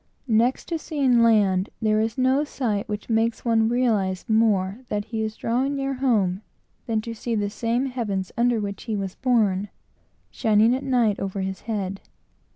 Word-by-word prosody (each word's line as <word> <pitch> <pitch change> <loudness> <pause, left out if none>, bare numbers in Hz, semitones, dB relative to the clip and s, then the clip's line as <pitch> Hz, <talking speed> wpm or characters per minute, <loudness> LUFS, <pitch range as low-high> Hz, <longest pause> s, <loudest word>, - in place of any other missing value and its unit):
Next 235 +2 +2
to 330 -2 -1
seeing 270 -7 +2
land, 205 -4 +3
there 215 -1 +2
is 225 +2 -2
no 260 +3 +3
sight 230 -7 -2
which 210 0 -4
makes 225 +1 0
one 225 -1 +3
realize 215 -7 0
more 215 -2 +2
that 205 0 -2
he 225 -2 -4
is 215 0 -3
drawing 260 +6 -1
near 275 0 -2
home, 215 -8 +1 0.5
than 220 -2 0
to 230 +1 -6
see 230 +1 -3
the 205 -1 -1
same 235 +4 -1
heavens, 210 -8 -3
under 240 -1 +2
which 200 -1 -5
he 225 -3 -2
was 195 -2 -3
born, 210 -6 +1 0.6
shining 220 0 +3
at 260 - -3
night 240 -6 +2
over 195 0 -3
his 190 0 -4
head. 195 -3 -3
225 Hz, 170 wpm, -24 LUFS, 205-245 Hz, 0.6 s, land